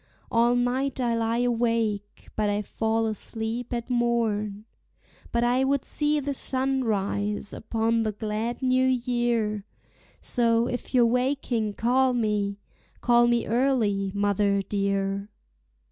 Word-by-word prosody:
All 235 +1 +3
night 255 +2 0
I 240 -2 +1
lie 230 +1 0
awake, 230 -4 -1
but 210 -1 +1
I 205 +1 0
fall 225 +2 -1
asleep 225 +2 -3
at 235 -1 -3
morn; 220 -4 0 0.7
But 235 0 +1
I 245 +2 +2
would 275 0 +1
see 300 0 0
the 285 0 -2
sun 265 0 -1
rise 205 -1 -1
upon 225 +1 0
the 220 -1 0
glad 220 +4 -3
new 255 0 +3
year, 240 -4 0 0.6
So, 230 -1 +2
if 245 +1 -4
you're 245 -2 +6
waking, 245 -3 0
call 255 +2 +2
me, 210 -4 0 0.4
call 240 0 +4
me 240 -1 +2
early, 225 -6 +1
mother 200 0 +1
dear. 195 0 -1
230 Hz, 130 wpm, -26 LUFS, 210-245 Hz, 0.7 s, you're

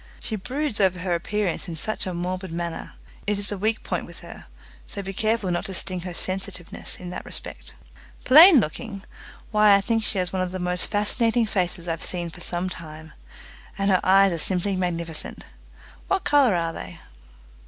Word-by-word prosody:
She 220 - -3
broods 255 +4 -2
over 190 -2 +3
her 180 0 -2
appearance 195 +2 -2
in 170 - -5
such 215 +5 -3
a 185 - -3
morbid 180 +1 -4
manner. 170 0 -5 0.3
It 205 0 +1
is 200 +1 +5
a 205 - -3
weak 220 +2 0
point - - -3
with - - -11
her, - - -11 0.4
so 200 - -5
be 195 +1 -5
careful 215 -2 0
not 175 - -1
to 190 - -3
sting 185 0 -1
her 180 0 -6
sensitiveness 185 -2 -2
in 180 -1 -8
that - - -6
respect." - - -5 0.5
"Plain 315 +3 +9
looking! 195 +2 -4 0.5
Why, 210 -1 +6
I 200 - +3
think 225 +2 0
she 210 - -1
has 180 -1 -1
one 185 - 0
of 185 -1 -2
the - - -2
most 180 0 0
fascinating 225 +3 +2
faces 180 -4 -2
I've 165 -1 -2
seen 175 -2 -1
for 175 - -11
some 175 +1 -2
time, 155 -3 -9 0.6
and 195 0 +1
her 185 - +3
eyes 195 +1 +5
are 165 - -3
simply 190 +3 +1
magnificent. 170 -3 -3 0.6
What 385 -2 0
colour 275 -8 +4
are 165 -1 -1
they?" 90 - -8
185 Hz, 190 wpm, -24 LUFS, 175-210 Hz, 0.6 s, Plain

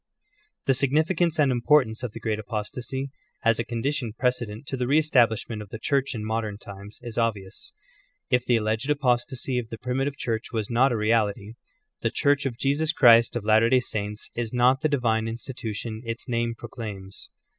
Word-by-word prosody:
The 135 - +4
significance 155 +6 +1
and 145 -4 +4
importance 120 -2 +3
of 125 -3 -4
the - - -7
great 110 -1 -2
apostasy, 125 +5 -4 0.3
as 115 -1 +3
a - - +1
condition 120 0 -2
precedent 125 -2 -1
to 135 - -3
the 125 -1 -2
re 140 +4 +4
establishment 120 -7 +2
of 105 - -10
the 110 - -6
Church 140 +2 0
in 105 -1 -4
modern 110 -2 -2
times, 100 0 -10
is 120 -1 -4
obvious. 105 -5 -2 0.6
If 125 -1 +2
the 125 - +2
alleged 110 +4 0
apos 125 -5 +2
tasy 130 0 -2
of 115 -2 -6
the 115 - -6
primitive 135 +4 -2
Church 115 -1 -3
was 110 -2 -2
not 125 +3 +4
a 120 - 0
reality, 105 -1 +1 0.5
the 115 - 0
Church 140 +3 +2
of 120 -3 -5
Jesus 145 +4 +1
Christ 115 -5 +6
of 115 -3 -3
Latter 110 +1 +5
day 130 0 +5
Saints 105 -3 -5
is 115 -2 -3
not 125 +2 +3
the 155 - +2
divine 115 -5 +1
in 115 - -3
stitution 115 -3 -5
its 115 +1 -5
name 115 -1 -1
proclaims. 105 -5 -8
120 Hz, 190 wpm, -25 LUFS, 110-130 Hz, 0.6 s, Christ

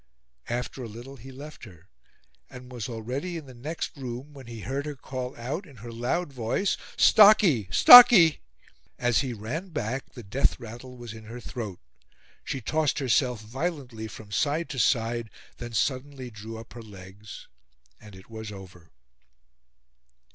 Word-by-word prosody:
After 125 +2 -4
a - - -5
little 120 +5 -10
he 130 +3 -12
left 145 +4 -11
her, 90 -4 -16 0.6
and 125 -1 -12
was 125 0 -5
already 125 +10 -4
in 155 - -8
the 130 - -12
next 145 +7 -5
room 130 +1 -7
when 135 -4 -12
he 115 -2 -8
heard 135 +8 -4
her 150 - -5
call 130 -1 -6
out 140 - -5
in 140 - -15
her 115 +1 -10
loud 130 +7 -2
voice: 125 - -1 0.2
"Stocky! 200 - +6
Stocky!" 235 - +10 0.6
As 120 -1 +2
he 135 -3 -2
ran 120 - -5
back 135 -5 -4
the 120 - -10
death 120 +9 0
rattle 120 +2 -10
was 120 -2 -9
in 110 -1 -12
her 115 +3 -8
throat. 110 -6 -7 0.6
She 135 - -4
tossed 155 +4 0
herself 125 -2 +1
violently 125 -2 -5
from 105 0 -12
side 150 - 0
to 130 - -4
side; 115 -1 +1 0.3
then 120 -1 -8
suddenly 130 +2 -2
drew 110 +1 -9
up 115 - -12
her 120 - -9
legs, 100 0 -12 0.5
and 105 -2 -14
it 95 +1 -15
was 110 -1 -8
over. 95 -4 -12
125 Hz, 160 wpm, -26 LUFS, 110-140 Hz, 0.6 s, Stocky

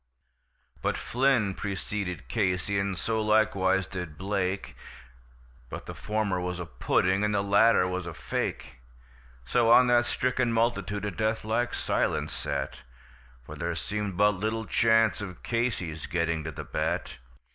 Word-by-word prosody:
But - - 0
Flynn 125 -6 +2
preceded 95 - -4
Casey, 95 +5 0
and 100 -2 -1
so 110 +4 -1
likewise 105 -3 +2
did 90 -5 -6
Blake, 95 0 -2 0.9
But - - -7
the - - -6
former 105 -4 -1
was 90 0 -3
a 90 - -4
pudding, 95 +4 +1
and 105 0 +1
the 100 - +1
latter 100 -1 +4
was 90 -1 -3
a 85 - -5
fake; 65 -2 -3 0.7
So 115 - +2
on 125 +2 +8
that 120 0 +4
stricken 125 -1 0
multitude 105 -3 0
a 105 - -2
death 110 +3 -1
like 120 +3 0
silence - - 0
sat, - - -3 0.6
For - - -9
there - - -3
seemed 105 -3 -3
but 105 +1 +5
little 110 +3 -2
chance 110 0 +3
of 90 -4 -8
Casey's 100 -10 -2
getting 85 -2 0
to 80 - -3
the - - -7
bat. 80 -5 -2
100 Hz, 145 wpm, -28 LUFS, 90-110 Hz, 0.9 s, on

